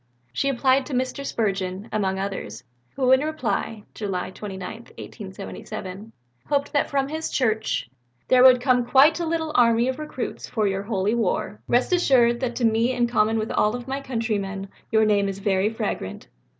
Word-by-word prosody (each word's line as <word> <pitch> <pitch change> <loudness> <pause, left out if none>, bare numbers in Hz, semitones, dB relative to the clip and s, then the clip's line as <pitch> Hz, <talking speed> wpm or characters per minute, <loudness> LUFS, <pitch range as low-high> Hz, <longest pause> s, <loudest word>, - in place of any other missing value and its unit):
She 275 - 0
applied 260 0 +2
to 275 - -3
Mr. 255 +2 -2
Spurgeon, 195 -5 -2
among 195 -3 0
others, 190 - -5 0.3
who 260 -2 +2
in 260 - +7
reply 230 -7 -2
(July 185 -3 -3
29, 190 -2 -7
1877) 205 -2 -8 0.4
hoped 285 -1 0
that 285 - +1
from 275 -1 0
his 315 +2 -3
church 220 - 0 0.4
"there 255 -1 +5
would 255 -1 +8
come 250 -1 +3
quite 280 +7 +5
a 340 - -1
little 320 -1 -1
army 235 -1 +4
of 260 +3 -3
recruits 300 -5 -5
for 220 -3 0
your 195 0 -1
holy 200 0 -1
war. 210 -2 -1
Rest 245 +8 +2
assured 245 -9 +4
that 245 -2 -2
to 245 - 0
me 225 +3 +2
in 245 -1 +2
common 225 -2 +2
with 220 0 -2
all 215 +4 +1
my 270 +2 -3
country 230 -5 -1
men 195 0 -5 0.2
your 220 -1 +4
name 200 -2 +2
is 195 - -5
very 200 0 +1
fragrant." 225 - -4
230 Hz, 175 wpm, -24 LUFS, 200-260 Hz, 0.4 s, would